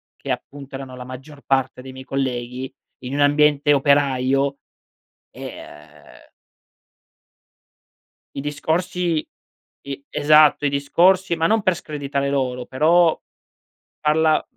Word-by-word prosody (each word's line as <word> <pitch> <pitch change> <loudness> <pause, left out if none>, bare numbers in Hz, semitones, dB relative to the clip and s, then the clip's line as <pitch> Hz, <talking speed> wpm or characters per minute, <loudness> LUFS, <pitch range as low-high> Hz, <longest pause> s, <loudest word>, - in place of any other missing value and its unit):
che - - -6
appunto 140 -1 -6
erano 135 -1 -8
la 125 - -8
maggior 135 +3 -11
parte 135 -1 0
dei 130 +1 -10
miei 130 0 -11
colleghi, 130 -1 -3 0.3
in 130 +2 -6
un - - -2
ambiente 145 0 +4
operaio, 140 -1 +2 0.7
e, - - -9
uhm 75 0 -16 2.1
i - - -2
discorsi 165 +3 -1 0.6
i 140 0 -6
Esatto, 150 0 +4
i - - +3
discorsi 175 +7 +2
ma 160 - +1
non 220 -1 +2
per 185 -3 +2
screditare 140 -3 -3
loro 125 -3 -1
però 165 +5 +3 0.8
parla 155 +1 +2
140 Hz, 115 wpm, -21 LUFS, 130-155 Hz, 2.1 s, ambiente